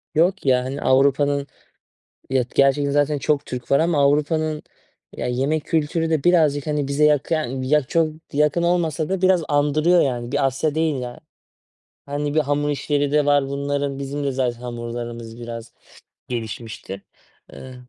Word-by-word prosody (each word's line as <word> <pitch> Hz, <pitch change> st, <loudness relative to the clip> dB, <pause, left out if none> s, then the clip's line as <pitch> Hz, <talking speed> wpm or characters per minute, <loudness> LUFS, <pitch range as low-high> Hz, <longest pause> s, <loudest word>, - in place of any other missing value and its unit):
Yok 175 Hz, +4 st, +2 dB
ya, 125 Hz, -2 st, +3 dB
hani, 135 Hz, +2 st, -5 dB
Avrupa'nın 140 Hz, +1 st, +2 dB, 0.8 s
Ya, 130 Hz, -1 st, +2 dB
gerçekten 140 Hz, +1 st, +3 dB
zaten 145 Hz, +1 st, +2 dB
çok 145 Hz, +2 st, 0 dB
Türk 125 Hz, -1 st, -7 dB
var 140 Hz, -, +5 dB
ama 165 Hz, -1 st, +1 dB
Avrupa'nın, 150 Hz, +2 st, +1 dB, 0.6 s
ya, -, -, -2 dB
yemek 135 Hz, +5 st, -1 dB
kültürü 160 Hz, +1 st, 0 dB
de 155 Hz, -4 st, 0 dB
birazcık, 155 Hz, -5 st, +3 dB
hani, 150 Hz, -2 st, -1 dB
bize 140 Hz, +2 st, 0 dB
yak 150 Hz, 0 st, +2 dB
yani, 130 Hz, -5 st, -1 dB
yak 150 Hz, -2 st, +2 dB
çok 165 Hz, -1 st, +2 dB, 0.3 s
yakın 150 Hz, +3 st, +2 dB
olmasa 170 Hz, -3 st, 0 dB
da 190 Hz, -1 st, -1 dB
biraz 185 Hz, -2 st, +3 dB
andırıyor, 150 Hz, +4 st, +3 dB
yani. 120 Hz, -3 st, -2 dB
Bir 140 Hz, -1 st, +1 dB
Asya 135 Hz, +3 st, -1 dB
değil, 160 Hz, -4 st, 0 dB
yani. 120 Hz, -1 st, -6 dB, 0.9 s
Hani, 145 Hz, +1 st, -3 dB
bir 155 Hz, -, +3 dB
hamur 145 Hz, 0 st, 0 dB
işleri 145 Hz, 0 st, 0 dB
de 150 Hz, -1 st, +3 dB
var 145 Hz, -1 st, +3 dB
bunların. 140 Hz, 0 st, -2 dB
Bizim 140 Hz, +1 st, -4 dB
de 140 Hz, -, 0 dB
zaten 125 Hz, -3 st, -1 dB
hamurlarımız 120 Hz, -1 st, -6 dB
biraz 115 Hz, 0 st, -8 dB, 0.6 s
gelişmiştir. 110 Hz, -4 st, -6 dB, 0.5 s
Iıı. 130 Hz, -1 st, -10 dB
145 Hz, 160 wpm, -22 LUFS, 130-150 Hz, 0.9 s, var